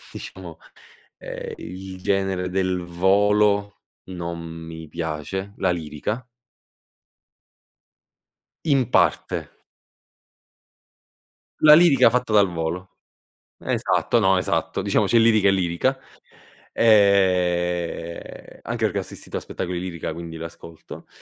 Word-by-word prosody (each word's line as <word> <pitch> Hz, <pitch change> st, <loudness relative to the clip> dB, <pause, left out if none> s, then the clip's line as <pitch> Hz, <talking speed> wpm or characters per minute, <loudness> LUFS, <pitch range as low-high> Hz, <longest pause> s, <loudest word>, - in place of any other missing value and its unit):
diciamo, -, -, -9 dB, 0.6 s
ehm, -, -, -7 dB
il 95 Hz, 0 st, -8 dB
genere 95 Hz, -2 st, 0 dB
del 95 Hz, -1 st, -1 dB
Volo 100 Hz, +3 st, +2 dB, 0.2 s
non 85 Hz, -2 st, -6 dB
mi 80 Hz, -1 st, -9 dB
piace, 85 Hz, +6 st, -4 dB
la -, -, +1 dB
lirica. 85 Hz, -, -4 dB, 2.4 s
In 135 Hz, -6 st, +2 dB
parte. 85 Hz, -, +1 dB, 2.1 s
La 150 Hz, 0 st, +9 dB
lirica 155 Hz, -8 st, +6 dB
fatta 125 Hz, -2 st, -1 dB
dal 100 Hz, -2 st, +5 dB
Volo. 85 Hz, +3 st, -3 dB, 0.7 s
Esatto, 120 Hz, -, 0 dB
no, 95 Hz, -2 st, +3 dB
esatto. 90 Hz, -, -1 dB
Diciamo -, -, +2 dB
c'è 120 Hz, -, +3 dB
lirica 110 Hz, -3 st, +4 dB
e 100 Hz, -, +6 dB
lirica. 95 Hz, +8 st, 0 dB, 0.7 s
E 90 Hz, -5 st, +1 dB
anche -, -, -4 dB
perché -, -, -1 dB
ho -, -, -1 dB
assistito -, -, -7 dB
a -, -, -2 dB
spettacoli 90 Hz, -1 st, -5 dB
lirica, 85 Hz, -3 st, -5 dB
quindi 85 Hz, -1 st, -8 dB
l'ascolto. 85 Hz, 0 st, -10 dB
95 Hz, 100 wpm, -23 LUFS, 85-105 Hz, 2.4 s, La